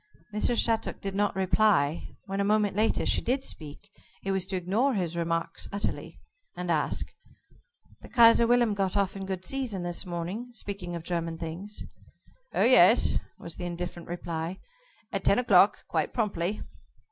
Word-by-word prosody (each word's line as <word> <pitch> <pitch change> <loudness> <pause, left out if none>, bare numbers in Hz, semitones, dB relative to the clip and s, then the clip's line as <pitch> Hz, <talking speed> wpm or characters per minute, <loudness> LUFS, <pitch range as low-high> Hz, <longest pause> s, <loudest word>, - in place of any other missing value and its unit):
Mrs. 220 +3 +1
Shattuck 225 -1 0
did 195 -1 -4
not 205 +1 0
reply. 190 -5 +2
When 195 -1 -4
a - - +2
moment 210 -1 +2
later, 215 +2 +1
she - - +2
did 260 +3 0
speak 155 - -7 0.3
it 195 - -1
was 190 -1 -1
to 190 - -3
ignore 210 +9 +1
his 175 -4 -2
remark 165 0 -2
utterly, 200 +1 -4 0.4
and 180 -1 -2
ask: 155 -2 -1 0.9
"The - - -12
Kaiser 235 -1 +6
Wilhelm 240 -2 +3
got 195 -1 -1
off 200 -1 +1
in 195 -1 -6
good 185 -1 -4
season 250 -9 -2
this 175 -1 -2
morning 180 +6 -4
speaking 200 -5 -6
of 170 - -6
German 165 -1 -3
things?" 175 +6 -6 0.7
"Oh, - - +1
yes," - - +6 0.2
was 170 - -9
the 180 - -5
indifferent 175 0 -6
reply, 170 0 -4 0.5
"at 195 -1 -3
ten 200 - +4
o'clock, 205 -5 +4
quite - - -1
promptly." 205 -3 -1
190 Hz, 160 wpm, -28 LUFS, 175-210 Hz, 0.9 s, Kaiser